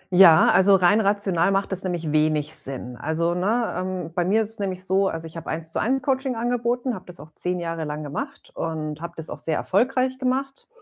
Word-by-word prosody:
Ja, 175 -4 +8
also 195 +1 +6
rein 195 +4 +4
rational 200 -3 +1
macht 195 0 0
das 190 - -2
nämlich 175 -4 -2
wenig 155 0 +1
Sinn. 125 -2 -3
Also, 165 +4 0
ne? 215 +7 0
Ähm, 185 -3 -4
bei 175 - +1
mir 215 +5 +3
ist 215 - -5
es 225 - -10
nämlich 185 -2 -3
so, 195 +1 +2
also 165 -2 -4
ich 160 +1 -10
habe 165 - -7
1:1 165 - -1
Coaching 265 -2 0
angeboten, 240 +2 -1
habe 190 - -8
das 180 -1 -11
auch 155 - -12
10 180 +2 -2
Jahre 165 -1 -3
lang 150 0 -4
gemacht 275 - -6
und 155 -2 -4
habe 170 - -6
das 160 - -7
auch - - -6
sehr 160 - -1
erfolgreich 255 +5 +1
gemacht. 270 +1 -2
185 Hz, 210 wpm, -24 LUFS, 160-225 Hz, -, Ja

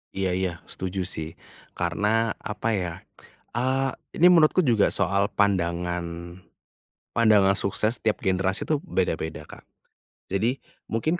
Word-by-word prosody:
Iya 95 -1 0
iya 95 -1 0 0.2
setuju 95 0 -3
sih, 80 -2 -5 0.4
karena 105 +6 +1
apa 105 +2 -3
ya, 90 -5 -1 0.6
eee, 130 +2 +1 0.2
ini 175 - +6
menurutku 170 +2 +5
juga 115 -7 +3
soal 100 0 +1
pandangan, 85 -3 -1 0.8
pandangan 105 -4 +5
sukses 110 +4 +1
setiap 110 -2 -1
generasi 95 0 0
itu 155 - +3
beda-beda, 80 -4 -2
Kak. - - -13 0.7
Jadi 115 +7 0 0.2
mungkin 155 +10 -1
100 Hz, 120 wpm, -25 LUFS, 90-115 Hz, 0.8 s, ini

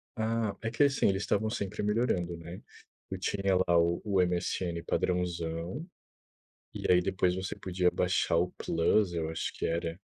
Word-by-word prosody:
Ah, 110 -2 -1
é 115 - -1
que, 125 - +3
assim, 140 -1 +3
eles 95 +1 0
estavam 110 +2 +1
sempre 100 -4 -3
melhorando, 105 -5 0
né, 85 +2 -9 0.5
tu 95 - -4
tinha 95 0 0
lá 90 -2 +3
o 85 +1 +2
o 100 -2 +1
MSN 85 -1 -1
padrãozão 90 - -2 0.9
e - - -2
aí 90 0 +6
depois 90 -1 +1
você 95 0 -3
podia 90 -1 +1
baixar 90 -2 +1
o 90 +2 +2
plus, 90 +3 +1
eu 80 -2 -2
acho 80 - -3
que - - -2
era. 85 +1 -2
90 Hz, 165 wpm, -30 LUFS, 85-100 Hz, 0.9 s, aí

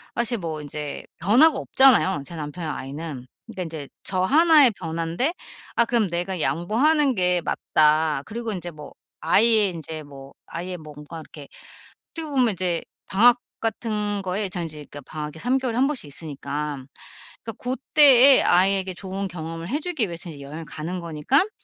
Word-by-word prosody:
사실 235 0 0
뭐 160 -4 -5
인제 150 0 -6 0.2
변화가 250 - +5
없잖아요, 220 - +4
제 170 - -9
남편이나 155 +1 -5
아이는. 140 -1 -7 0.2
그러니까 210 -5 -6
인제 155 -4 -7 0.2
저 185 -1 0
하나의 305 - +6
변환데 170 - -2 0.4
아 235 - +4
그럼 230 -5 +1
내가 175 +1 -2
양보하는 245 - +2
게 180 -2 +2
맞다. 155 -2 +2
그리고 230 +1 -5
인제 175 -3 -5
뭐 150 -2 -11 0.3
아이의 220 -2 +4
인제 160 -1 -7
뭐 140 -1 -13
아이의 180 +2 -5
뭔가 155 0 -10
이렇게 150 -2 -12 0.7
어떻게 325 -1 -5
보면 260 -5 +2
인제 180 -3 -1 0.2
방학 240 +5 +5 0.2
같은 210 -3 -2
거에 190 +1 -3
전 175 -1 -3
인제 150 -2 -8 0.2
방학이 150 0 -6
3 250 +8 +1
개월에 255 -3 -2
1 260 +2 +3
번씩 290 - -3
있으니까. 145 -1 -5 0.6
그러니까 225 - -6
고 250 +1 -1 0.2
때에 275 -3 +8
아이에게 190 +1 +2
좋은 190 +2 -5
경험을 165 -1 -7
해주기 295 - -1
위해서 170 -1 -7
이 145 -3 -10
여행을 150 +4 -8
가는 165 +4 -5
거니깐 170 - +1
180 Hz, 345 characters per minute, -23 LUFS, 155-230 Hz, 0.7 s, 때에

